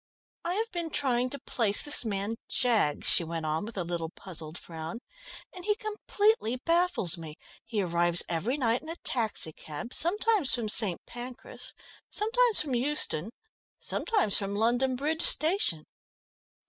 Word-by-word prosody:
"I 350 +2 -1
have 450 +2 -2
been 340 -2 -3
trying 255 -4 +1
to 280 - -4
place 225 -5 0
this 290 - +5
man 210 0 -2
Jaggs," 225 - +1
she - - +5
went 165 -1 -4
on 155 +5 -1
with 225 -1 -8
a 185 - 0
little 170 -1 -3
puzzled 165 -3 -4
frown, 165 +5 -7 0.5
"and 360 - -9
he 420 +2 +1
completely 425 - 0
baffles 330 - +2
me. 155 -2 -8 0.3
He 225 -3 -1
arrives 175 0 +3
every 185 - -1
night 240 -3 +1
in 315 - -11
a 330 - -4
taxicab, 220 - -3
sometimes 410 - +2
from 230 -3 -3
St. 205 -5 +3
Pancras, 250 - -7 0.3
sometimes 460 +2 +2
from 285 -4 -3
Euston, 240 - +2 0.5
sometimes 415 - +1
from 200 0 -3
London 245 +4 +1
Bridge 305 +5 -1
Station." 310 - +2
240 Hz, 145 wpm, -29 LUFS, -, 0.5 s, this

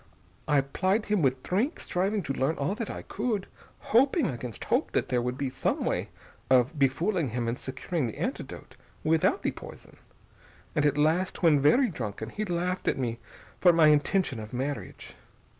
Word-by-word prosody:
I 145 -2 +4
plied 190 +10 0
him 210 -3 +1
with 130 -2 +1
drink, 230 - 0
striving 195 +3 -1
to 135 - -2
learn 135 +4 0
all 140 +7 -1
that 225 0 -4
I - - -6
could, 215 -6 -2 0.5
hoping 270 +5 +4
against 125 - -4
hope - - 0
that - - 0
there 125 -1 +1
would 125 +1 -2
be 135 -2 -2
some - - -1
way - - -1 0.4
of 130 +2 +4
befooling 160 +4 +1
him 120 +1 -2
and 115 +2 -2
securing 140 +2 -2
the 110 - -7
antidote - - -5 0.3
without 160 0 +2
the - - +1
poison.... - - -12 0.8
And 150 0 +3
at 145 0 0
last, 165 +6 +1
when 155 -4 +6
very 240 - +4
drunken, 110 - -5
he 215 - -3
laughed 180 0 -2
at - - +2
me 120 -3 -2 0.4
for 180 - +6
my 165 -2 +5
intention 150 - +2
of 110 +2 -8
marriage. 135 +3 -4
150 Hz, 175 wpm, -28 LUFS, 130-190 Hz, 0.8 s, when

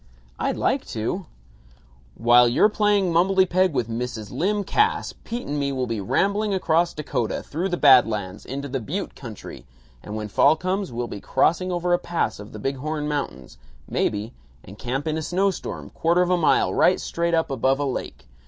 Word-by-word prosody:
"I'd - - -1
like - - +1
to." 155 - -3 0.9
"While 120 +1 +5
you're 130 - +4
playing 205 -4 +2
mumblety 190 +2 +4
peg 185 +1 +2
with 125 -6 -1
Mrs. 115 -2 -5
Lym 205 +4 0
Cass, 430 - +1
Pete 235 +2 -5
and 145 0 -2
me 140 -1 0
will 130 -2 -1
be 115 -3 -3
rambling 200 - +1
across 170 -1 +1
Dakota, 130 -6 -2
through 175 +6 -3
the 175 - -1
Bad 130 -7 +7
Lands, 105 -4 -4
into 140 +2 -5
the 135 0 -3
butte 165 - -4
country, 115 -6 -10 0.4
and 105 - -7
when 105 -1 -4
fall 105 - +4
comes, 185 +2 -2
we'll 120 +1 -3
be 100 -4 -7
crossing 185 +2 +1
over 175 0 0
a 175 - +3
pass 170 -10 -2
of 105 +1 -10
the - - -8
Big 135 +6 -3
Horn 150 +2 -3
Mountains, 65 - -4 0.3
maybe, 105 +4 -1 0.3
and 100 +4 -13
camp 130 +4 -3
in 155 0 -1
a - - -4
snow 190 +5 +1
storm, - - -7
quarter 170 +2 +2
of 180 - -1
a - - +5
mile 170 -3 +2
right 185 - +4
straight 170 0 -1
up 160 -3 0
above 135 +1 +1
a 145 - -1
lake. 130 - -5
150 Hz, 195 wpm, -23 LUFS, 120-180 Hz, 0.9 s, Bad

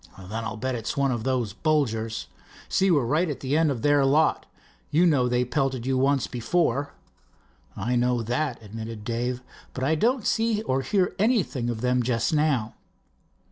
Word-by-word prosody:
"Then 100 +4 -6
I'll 110 -1 -4
bet 130 +3 -2
it's 115 +1 -4
one 140 -1 +2
of 120 -3 -2
those 125 -6 0
Bolgers. 115 - 0 0.4
See, 195 - +2
we're 145 -8 +3
right 155 +8 +1
at 145 - -5
the 135 +2 -1
end 160 0 +3
of 125 -5 -3
their 145 -1 +4
lot. 145 +4 +2 0.4
You 160 +5 +3
know 140 -7 +3
they 125 0 +1
pelted 130 -2 -1
you 135 0 +1
once 135 +1 +2
before?" 140 +2 -1 0.8
"I 120 +6 -1
know 120 -1 +1
that," 125 +3 -2
admitted 110 +1 -7
Dave, 120 +2 -2 0.3
"but 130 - -3
I 145 +4 +2
don't 230 - +1
see 225 -1 +1
or 135 -9 0
hear 180 +7 +1
anything 195 - +1
of 115 -2 -3
them 125 0 +2
just 120 +2 0
now." 145 -8 +1
130 Hz, 180 wpm, -25 LUFS, 115-150 Hz, 0.8 s, their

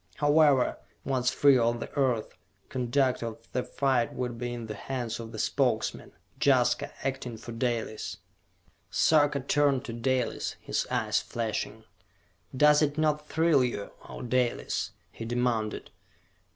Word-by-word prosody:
However, 145 -2 +4 0.3
once 130 -2 +1
free 135 0 +5
of 120 0 +1
the - - -6
Earth, 130 -6 0 0.3
conduct 130 +1 +1
of 115 -1 -4
the 125 - 0
fight 130 -3 0
would 120 -2 -3
be 120 0 -3
in 120 -1 -5
the 110 - -5
hands 120 +1 -4
of 115 -1 -7
the 110 - -7
Spokesman - - 0 0.3
Jaska, - - +3
acting 130 -4 -3
for 120 - -9
Dalis. 115 -2 -2 0.7
Sarka 145 -3 +3
turned 140 -1 +2
to 115 - -5
Dalis, 125 +2 -1
his - - -2
eyes - - +1
flashing. 110 -1 -4 0.7
"Does 150 +2 +6
it 145 0 +1
not 150 -1 +1
thrill 160 -4 +3
you, 120 -5 -3 0.2
O - - -7
Dalis?" 125 0 0 0.2
he - - -8
demanded. 115 -2 -1
125 Hz, 140 wpm, -28 LUFS, 115-140 Hz, 0.7 s, Does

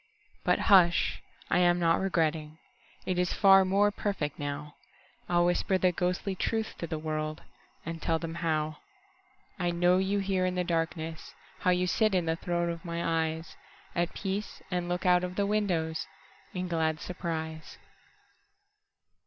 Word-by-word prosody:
But - - +3
hush, 180 -4 +4 0.3
I - - +4
am 175 -1 +4
not 165 -1 +3
regretting:It 160 0 -3
is 180 -1 +1
far 195 -1 +7
more 200 +2 +3
perfect 195 -8 -3
now. 145 +1 -4 0.6
I'll 175 0 +3
whisper 175 +2 +2
the 185 -1 +3
ghostly 180 +3 -1
truth 220 +4 -2
to 170 - -3
the 160 -1 -3
worldAnd 155 +1 -6
tell 165 - +1
them 165 0 -5
howI 155 +1 -5
know 180 +1 +4
you 195 +2 +1
here 195 -2 0
in 185 0 0
the 180 - +1
darkness, 165 -3 -3 0.2
How - - +1
you 180 0 +3
sit 215 +2 +2
in 180 -2 +1
the 160 0 +1
throne 170 0 -1
of 170 +1 -7
my 170 -2 -4 1.0
eyesAt 175 0 -1
peace, 195 +1 -4
and 175 -1 -1
look 180 +2 -2
out 180 0 +4
of 180 0 -4
the 200 - +1
windowsIn 180 -2 -3
glad 160 -2 0
surprise. 160 -3 -5
175 Hz, 145 wpm, -29 LUFS, 160-185 Hz, 1.0 s, far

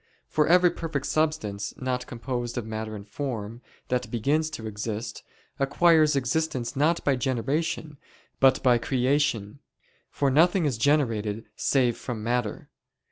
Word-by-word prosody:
For 150 -1 +1
every 180 +1 +5
perfect 155 -4 -4
substance, 155 -11 -1
not 125 -1 -2
composed 120 0 -4
of 120 - -2
matter 110 0 -5
and 100 0 -9
form, 115 -2 -5 0.3
that 125 0 -1
begins 145 +7 +1
to 115 -8 -7
exist, 110 +1 -4 0.4
acquires 155 +2 +4
existence 135 -2 -1
not 155 +5 +2
by 140 - +2
generation, 140 +4 -2 0.4
but 130 -1 +4
by 125 -3 +5
creation: 130 -3 0 0.5
for 140 -2 0
nothing 170 +5 +4
is 130 -6 -1
generated 115 -7 +1
save 125 -4 +2
from 115 -4 -5
matter. 120 -2 -2
130 Hz, 135 wpm, -26 LUFS, 115-150 Hz, 0.5 s, every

